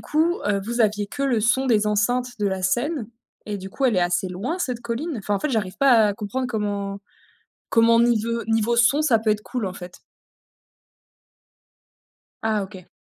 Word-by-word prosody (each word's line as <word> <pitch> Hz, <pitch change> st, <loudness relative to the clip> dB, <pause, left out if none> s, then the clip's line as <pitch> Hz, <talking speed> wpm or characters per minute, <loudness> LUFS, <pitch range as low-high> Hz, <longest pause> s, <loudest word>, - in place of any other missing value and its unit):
coup, 325 Hz, +3 st, 0 dB
heu, 205 Hz, -1 st, +1 dB
vous 235 Hz, +3 st, -3 dB
aviez 210 Hz, -2 st, +2 dB
que 275 Hz, +7 st, -5 dB
le 250 Hz, -5 st, +1 dB
son 255 Hz, +5 st, +2 dB
des 215 Hz, -4 st, +3 dB
enceintes 245 Hz, +4 st, 0 dB
de 205 Hz, -, +1 dB
la 190 Hz, -1 st, -3 dB
scène 240 Hz, -, -1 dB, 0.4 s
et 205 Hz, -1 st, -4 dB
du 190 Hz, 0 st, -8 dB
coup 270 Hz, -, -3 dB
elle 245 Hz, -4 st, +3 dB
est -, -, +3 dB
assez 175 Hz, +1 st, 0 dB
loin 220 Hz, -, -4 dB
cette 250 Hz, -9 st, -2 dB
colline? 245 Hz, +7 st, -3 dB
Enfin 205 Hz, 0 st, -2 dB
en -, -, 0 dB
fait 300 Hz, -, -1 dB
j'arrive 210 Hz, -6 st, -2 dB
pas 240 Hz, -6 st, +5 dB
à 205 Hz, -, -1 dB
comprendre 220 Hz, +6 st, -3 dB
comment 205 Hz, -3 st, -3 dB, 0.7 s
comment 230 Hz, 0 st, +4 dB
nive 230 Hz, 0 st, +1 dB
niveau 225 Hz, +1 st, +1 dB
son, 255 Hz, +6 st, +4 dB
ça 260 Hz, -7 st, +3 dB
peut 220 Hz, 0 st, 0 dB
être 210 Hz, 0 st, 0 dB
cool 245 Hz, -3 st, -3 dB
en 185 Hz, -, -5 dB
fait? 180 Hz, 0 st, -10 dB, 2.4 s
Ah 220 Hz, -2 st, 0 dB
OK. 190 Hz, -2 st, -11 dB
225 Hz, 190 wpm, -23 LUFS, 205-250 Hz, 2.4 s, pas